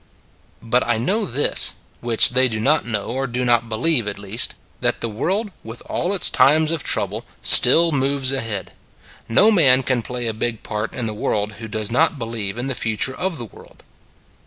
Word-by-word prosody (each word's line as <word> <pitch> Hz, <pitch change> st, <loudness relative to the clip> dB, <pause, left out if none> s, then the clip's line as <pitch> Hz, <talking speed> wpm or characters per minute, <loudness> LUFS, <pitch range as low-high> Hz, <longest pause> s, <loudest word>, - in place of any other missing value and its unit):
But 120 Hz, +2 st, 0 dB
I 120 Hz, -2 st, 0 dB
know 200 Hz, -, -2 dB
this 140 Hz, +2 st, +2 dB, 0.2 s
which 120 Hz, 0 st, +5 dB
they 130 Hz, +1 st, +3 dB
do 110 Hz, -2 st, -5 dB
not 140 Hz, +4 st, 0 dB
know, 105 Hz, -3 st, -3 dB
or 135 Hz, +2 st, -4 dB
do 125 Hz, +1 st, -4 dB
not 120 Hz, -1 st, 0 dB
believe, 120 Hz, +1 st, 0 dB
at 105 Hz, -, -5 dB
least 100 Hz, +3 st, 0 dB, 0.2 s
that -, -, -2 dB
the -, -, -3 dB
world, 190 Hz, -, -4 dB
with 115 Hz, +1 st, -10 dB
all 180 Hz, +3 st, -3 dB
its 190 Hz, -, +2 dB
times 155 Hz, +3 st, +2 dB
of 165 Hz, -3 st, -2 dB
trouble, -, -, -1 dB, 0.2 s
still 165 Hz, +7 st, +7 dB
moves 135 Hz, -1 st, 0 dB
ahead. 115 Hz, -7 st, -5 dB, 0.6 s
No 205 Hz, -, +4 dB
man 135 Hz, -10 st, +5 dB
can 125 Hz, -1 st, -1 dB
play 125 Hz, +1 st, -6 dB
a 115 Hz, -, -3 dB
big 115 Hz, +1 st, -5 dB
part 105 Hz, +1 st, -5 dB
in 120 Hz, -, -5 dB
the 110 Hz, -, -5 dB
world 105 Hz, 0 st, -3 dB
who 115 Hz, -, -8 dB
does 110 Hz, -1 st, -4 dB
not 155 Hz, +5 st, +1 dB
be 120 Hz, -, -6 dB
lieve 110 Hz, -2 st, -6 dB
in 120 Hz, -, -5 dB
the 135 Hz, -, -2 dB
future 115 Hz, +3 st, -2 dB
of 185 Hz, -3 st, -4 dB
the 120 Hz, -, -7 dB
world. 105 Hz, -, -18 dB
120 Hz, 200 wpm, -19 LUFS, 110-140 Hz, 0.6 s, still